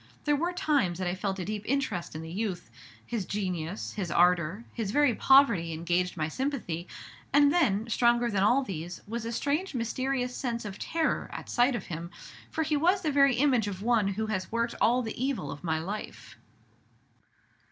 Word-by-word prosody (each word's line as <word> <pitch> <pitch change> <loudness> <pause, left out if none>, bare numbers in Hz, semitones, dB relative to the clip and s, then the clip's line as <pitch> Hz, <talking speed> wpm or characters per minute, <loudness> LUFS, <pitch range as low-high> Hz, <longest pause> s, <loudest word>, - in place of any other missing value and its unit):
There 295 -1 +3
were 340 +5 0
times 285 - +1
that 185 -1 -2
I 175 - 0
felt 190 +1 -2
a 185 - -4
deep 210 0 -3
interest 240 - -1
in 160 - -5
the 160 - -8
youth: 190 -3 -3 0.3
his 230 -4 -2
genius, 185 -2 -3
his 190 -5 -3
ardor, 180 +4 +2
his 225 -4 -3
very 290 +2 +3
poverty 230 -12 +4
engaged 175 +3 -1
my 155 -1 0
sympathy; 185 - -3 0.4
and 290 0 +5
then, 225 - +2
stronger 240 +1 +3
than 200 -2 +1
all 245 +7 +4
these, 175 -5 -6
was 230 +1 -4
a 230 - -3
strange, 290 +8 -1
mysterious 250 +2 -1
sense 235 -4 -3
of 205 -1 -7
terror 325 -1 -1
at - - -7
sight 245 +1 +3
of - - -4
him, 170 0 -6 0.4
for 320 - -1
he 305 -1 0
was 360 +6 +2
the 310 - +1
very 275 -2 +5
image 250 -5 +3
of 195 -1 -5
one 230 -3 +3
who 205 +3 -1
has 200 -4 -3
worked 230 +1 0
all 250 +2 +4
the 230 +2 -4
evil 265 -7 -2
of 145 - -9
my 160 -2 0
life." 195 +7 -6
225 Hz, 190 wpm, -29 LUFS, 185-270 Hz, 0.4 s, and